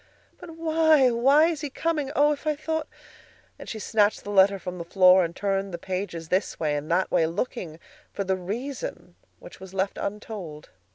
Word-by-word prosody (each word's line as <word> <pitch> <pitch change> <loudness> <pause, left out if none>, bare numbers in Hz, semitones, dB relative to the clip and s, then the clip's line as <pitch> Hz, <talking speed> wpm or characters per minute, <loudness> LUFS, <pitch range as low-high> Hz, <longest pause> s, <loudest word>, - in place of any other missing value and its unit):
"But 330 -3 -11
why? 315 -5 +4
Why 270 +6 +5
is 325 -3 -1
he 295 - -4
coming? 300 -1 -2
Oh, 295 0 +4
if 300 +1 -4
I 305 - +2
thought—" 315 +1 -3 0.7
and - - -9
she 225 - -5
snatched 210 -1 +1
the 205 - -6
letter 195 0 +5
from 180 -1 -7
the - - -4
floor 185 +1 +5
and 170 0 -4
turned 195 -1 -1
the 170 - -4
pages 180 -2 -5
this 185 +2 -1
way 150 -2 0
and 145 +1 -4
that 180 +3 +1
way, 160 - +3
looking 170 -2 -4 0.3
for 200 - -3
the 190 0 0
reason, 245 - -6 0.2
which - - -13
was 190 0 -11
left 190 +1 -1
untold. 200 -7 -6
200 Hz, 190 wpm, -25 LUFS, 180-290 Hz, 0.7 s, Why